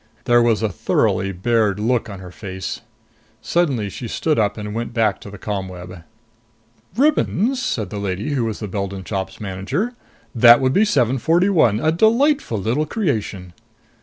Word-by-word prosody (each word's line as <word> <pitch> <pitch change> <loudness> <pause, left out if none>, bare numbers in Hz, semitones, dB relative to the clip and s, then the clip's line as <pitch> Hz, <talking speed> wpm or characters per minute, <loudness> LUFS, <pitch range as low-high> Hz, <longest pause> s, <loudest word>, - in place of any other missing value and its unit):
There 120 0 +4
was 115 -2 +2
a 110 - +1
thoroughly 95 +2 0
bared 105 +1 +1
look 115 +1 0
on 100 - -7
her 90 -1 -10
face. 95 0 -6 0.6
Suddenly 140 -12 0
she 120 - -6
stood 155 +5 0
up 105 0 0
and 105 -1 -5
went 115 +1 -4
back 110 -4 +1
to - - -9
the 105 - -10
ComWeb. 90 -3 -6 0.9
"Ribbons?" 265 - +2
said 110 - -2
the 105 - -4
lady 100 +6 -3
who 130 -5 0
was 110 -1 -4
the 105 - -3
Beldon 100 -1 -4
Shop's 95 -1 -4
manager. 100 - -3 0.4
"That 120 0 +7
would 130 0 +1
be 205 +7 +4
741. 155 - +2
A 155 +5 +2
delightful 230 - +2
little 120 +10 -1
creation!" 110 - -3
110 Hz, 160 wpm, -20 LUFS, 100-150 Hz, 0.9 s, That